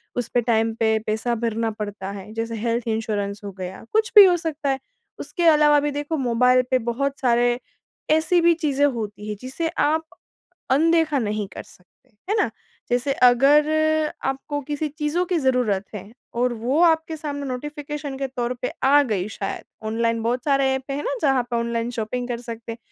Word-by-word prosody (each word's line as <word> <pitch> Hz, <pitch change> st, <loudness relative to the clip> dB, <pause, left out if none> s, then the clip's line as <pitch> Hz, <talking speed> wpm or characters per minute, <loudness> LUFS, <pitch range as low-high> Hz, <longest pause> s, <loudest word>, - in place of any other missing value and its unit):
उस 245 Hz, -2 st, -2 dB
पे 245 Hz, -, +3 dB
टाइम 225 Hz, -1 st, +2 dB
पे 220 Hz, -1 st, +3 dB
पैसा 220 Hz, +3 st, 0 dB
भरना 225 Hz, 0 st, -1 dB
पड़ता 205 Hz, -2 st, -5 dB
है, 200 Hz, +1 st, -9 dB
जैसे 225 Hz, 0 st, -3 dB
हेल्थ 230 Hz, +1 st, -2 dB
इंश्योरेंस 210 Hz, -2 st, -2 dB
हो 200 Hz, -, -5 dB
गया, 185 Hz, +1 st, -6 dB
कुछ 440 Hz, +1 st, +1 dB
भी 410 Hz, -2 st, +12 dB
हो 360 Hz, -2 st, +5 dB
सकता 315 Hz, -4 st, -3 dB
है। 270 Hz, 0 st, 0 dB, 0.4 s
उसके 350 Hz, -, -4 dB
अलावा 300 Hz, -2 st, +6 dB
भी 295 Hz, 0 st, -1 dB
देखो, 290 Hz, +2 st, -3 dB
मोबाइल 250 Hz, 0 st, +3 dB
पे 260 Hz, -, +5 dB
बहुत 275 Hz, +3 st, -2 dB
सारे 240 Hz, -1 st, +2 dB, 0.5 s
ऐसी 315 Hz, +3 st, +3 dB
भी 340 Hz, 0 st, +5 dB
चीज़ें 290 Hz, -4 st, +1 dB
होती 215 Hz, -6 st, -3 dB
हैं 210 Hz, -, -3 dB
जिसे 265 Hz, +6 st, -3 dB
आप, 320 Hz, -1 st, 0 dB, 0.7 s
अनदेखा 320 Hz, +1 st, +3 dB
नहीं 210 Hz, -3 st, -2 dB
कर -, -, -7 dB
सकते, 180 Hz, +8 st, -22 dB, 0.2 s
है 425 Hz, -, +2 dB
ना? -, -, 0 dB, 0.4 s
जैसे 250 Hz, +3 st, +1 dB
अगर 275 Hz, +5 st, +6 dB, 0.6 s
आपको 270 Hz, +2 st, -2 dB
किसी 295 Hz, +2 st, -3 dB
चीज़ों 300 Hz, +4 st, -1 dB
की 355 Hz, -1 st, 0 dB
ज़रूरत 250 Hz, -8 st, +1 dB
है, 205 Hz, +1 st, -8 dB, 0.2 s
और 245 Hz, +1 st, +1 dB
वो 245 Hz, +7 st, -1 dB
आपके 320 Hz, -1 st, +2 dB
सामने 285 Hz, -2 st, -5 dB
नोटिफिकेशन 290 Hz, +1 st, -5 dB
के 270 Hz, -, -2 dB
तौर 250 Hz, -2 st, -3 dB
पे 250 Hz, -, -2 dB
आ 285 Hz, +2 st, +6 dB
गई 210 Hz, -7 st, -2 dB
शायद, 200 Hz, -1 st, -5 dB, 0.2 s
ऑनलाइन 230 Hz, +1 st, 0 dB
बहुत 240 Hz, +2 st, -1 dB
सारे 275 Hz, -2 st, +3 dB
ऐप 265 Hz, -, -3 dB
हैं 285 Hz, +2 st, -3 dB
ना 280 Hz, -, -2 dB
जहाँ 270 Hz, -5 st, +3 dB
पे 235 Hz, -, 0 dB
ऑनलाइन 235 Hz, 0 st, -1 dB
शॉपिंग 245 Hz, +2 st, -3 dB
कर 240 Hz, -1 st, -3 dB
सकते। 230 Hz, -1 st, -7 dB
250 Hz, 185 wpm, -23 LUFS, 230-295 Hz, 0.7 s, भी